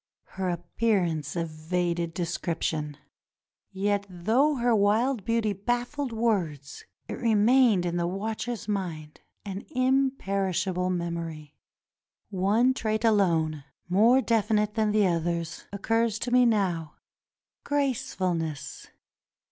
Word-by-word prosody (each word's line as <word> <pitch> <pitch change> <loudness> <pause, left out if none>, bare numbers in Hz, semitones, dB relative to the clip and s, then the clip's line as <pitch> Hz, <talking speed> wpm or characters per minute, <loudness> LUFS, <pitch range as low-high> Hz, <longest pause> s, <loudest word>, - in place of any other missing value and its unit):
Her 190 -1 -3
appearance 175 -3 -1
evaded 170 +1 -2
description. 165 -4 -2 0.7
Yet, 200 +1 -1
though 225 - +2
her 240 -2 +2
wild 215 +3 +2
beauty 230 -1 0
baffled 245 +6 -2
words, 185 - -1 0.2
it - - -5
remained 225 -3 +4
in 175 0 -1
the 170 0 0
watcher's 220 +4 -4
mind 170 -7 -4
— - - -48
an 195 0 -5
imperishable 195 - 0
memory. 170 -4 -4 0.8
One 210 +7 +3
trait 220 -2 -1
alone, 165 -9 +2 0.2
more 225 +8 +5
definite 210 -3 +1
than 220 -1 +1
the 210 -1 +3
others, 170 -1 -2
occurs 225 +2 0
to 245 - -2
me 250 0 +5
now 180 -8 0 0.3
— - - -67
gracefulness. 185 - -2
195 Hz, 110 wpm, -27 LUFS, 170-230 Hz, 0.8 s, more